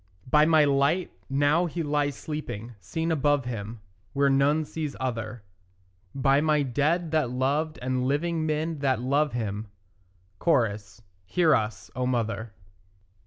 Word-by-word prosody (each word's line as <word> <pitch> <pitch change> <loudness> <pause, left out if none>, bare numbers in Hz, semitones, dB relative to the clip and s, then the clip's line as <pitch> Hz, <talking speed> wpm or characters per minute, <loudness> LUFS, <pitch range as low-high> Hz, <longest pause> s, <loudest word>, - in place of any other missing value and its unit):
By 150 +4 +5
my 155 -2 +5
light, 140 +6 +2 0.2
now 145 +6 +2
he 170 +1 -3
lies 145 -2 0
sleeping, 120 -2 -6
seen 160 - -3
above 145 -3 +2
him 110 -2 -5 0.3
Where 140 0 +3
none 145 +3 +3
sees 150 -1 -5
other; 115 -3 -4 0.7
By 135 +1 +3
my 150 -1 +2
dead 150 +6 0
that 155 -6 +1
loved 140 +5 0
and 130 0 0
living 160 +3 0
men 155 +1 -1
that 135 -4 +1
love 140 +4 +1
him; 110 -2 -3 0.8
(Cho.) 120 -11 +3 0.5
Hear 165 - +3
us, 110 0 -1
O 125 0 -1
mother. 115 -2 -2
140 Hz, 135 wpm, -26 LUFS, 125-155 Hz, 0.8 s, By